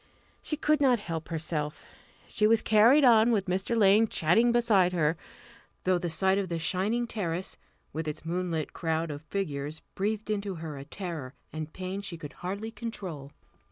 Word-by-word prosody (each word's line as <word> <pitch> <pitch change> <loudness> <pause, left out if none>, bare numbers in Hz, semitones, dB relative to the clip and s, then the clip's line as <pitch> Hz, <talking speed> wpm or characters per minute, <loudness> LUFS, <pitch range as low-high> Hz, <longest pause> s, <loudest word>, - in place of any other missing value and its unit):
She 305 - -3
could 305 0 +2
not 255 -3 +5
help 165 -6 -5
herself. 155 -2 -3 0.4
She 210 - +2
was 225 0 +4
carried 230 +7 +6
on, 230 -2 +6
with 210 -5 +2
Mr. 190 +5 0
Lane 210 +1 +5
chatting 220 +8 +3
beside 215 -7 +3
her 160 -2 +2 0.7
though 185 -1 +2
the 175 -1 -2
sight 190 +4 +2
of 190 -3 -3
the 170 - -1
shining 190 +9 0
terrace, 185 -6 -3 0.4
with 160 0 -3
its 150 +1 -5
moonlit 170 -2 -2
crowd 160 -1 -1
of 145 0 -6
figures, 155 -4 -4
breathed 215 +2 -2
into 200 -2 -2
her 160 -2 -6
a 140 0 -8
terror 160 -6 -6 0.2
and 155 0 -5
pain 185 +3 -5
she 190 -4 -6
could 150 -2 -9
hardly 200 +5 -4
control. 185 - -6
185 Hz, 170 wpm, -29 LUFS, 160-215 Hz, 0.7 s, carried